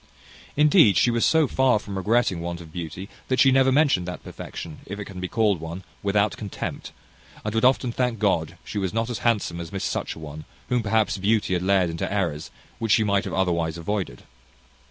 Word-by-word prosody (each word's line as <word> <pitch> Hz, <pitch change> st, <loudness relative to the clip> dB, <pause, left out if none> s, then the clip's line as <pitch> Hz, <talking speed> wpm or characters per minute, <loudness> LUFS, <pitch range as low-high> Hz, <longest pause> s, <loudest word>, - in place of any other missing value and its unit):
Indeed, 150 Hz, -, +6 dB
she 120 Hz, -, +4 dB
was 115 Hz, 0 st, +1 dB
so 160 Hz, -2 st, +4 dB
far 130 Hz, -2 st, +3 dB
from 100 Hz, -1 st, -7 dB
regretting 100 Hz, -2 st, +1 dB
want 85 Hz, 0 st, -4 dB
of 80 Hz, -2 st, -12 dB
beauty, 90 Hz, +3 st, -6 dB, 0.2 s
that 130 Hz, -, 0 dB
she 135 Hz, -, +6 dB
never 135 Hz, 0 st, +4 dB
mentioned 135 Hz, -, +3 dB
that 90 Hz, -, -6 dB
perfection, 80 Hz, -2 st, -8 dB
if 100 Hz, -, -5 dB
it 105 Hz, -, -5 dB
can 95 Hz, -2 st, -9 dB
be 90 Hz, -, -3 dB
called 105 Hz, -3 st, +1 dB
one, 85 Hz, +3 st, -6 dB, 0.2 s
without 100 Hz, +1 st, +1 dB
contempt; 105 Hz, -3 st, -6 dB, 0.5 s
and 105 Hz, -, -2 dB
would 110 Hz, -, 0 dB
often 130 Hz, -1 st, +3 dB
thank 125 Hz, -1 st, -1 dB
God 85 Hz, -5 st, 0 dB
she 105 Hz, -, -4 dB
was 95 Hz, -1 st, -2 dB
not 115 Hz, +2 st, 0 dB
as 120 Hz, -, -3 dB
handsome 105 Hz, -7 st, 0 dB
as 85 Hz, -, -8 dB
Miss 95 Hz, -, -4 dB
Such -, -, -2 dB
a -, -, -10 dB
one, 75 Hz, 0 st, -8 dB, 0.2 s
whom 125 Hz, -1 st, +2 dB
perhaps 110 Hz, -1 st, +1 dB
beauty 105 Hz, 0 st, +1 dB
had 90 Hz, -, +1 dB
led 95 Hz, -2 st, +2 dB
into 80 Hz, -, -3 dB
errors 85 Hz, -7 st, -1 dB, 0.3 s
which 115 Hz, -2 st, +2 dB
she 110 Hz, -, +4 dB
might 100 Hz, -1 st, +1 dB
have -, -, -5 dB
otherwise 85 Hz, -3 st, 0 dB
avoided. 95 Hz, +3 st, -3 dB
100 Hz, 210 wpm, -24 LUFS, 85-115 Hz, 0.5 s, Indeed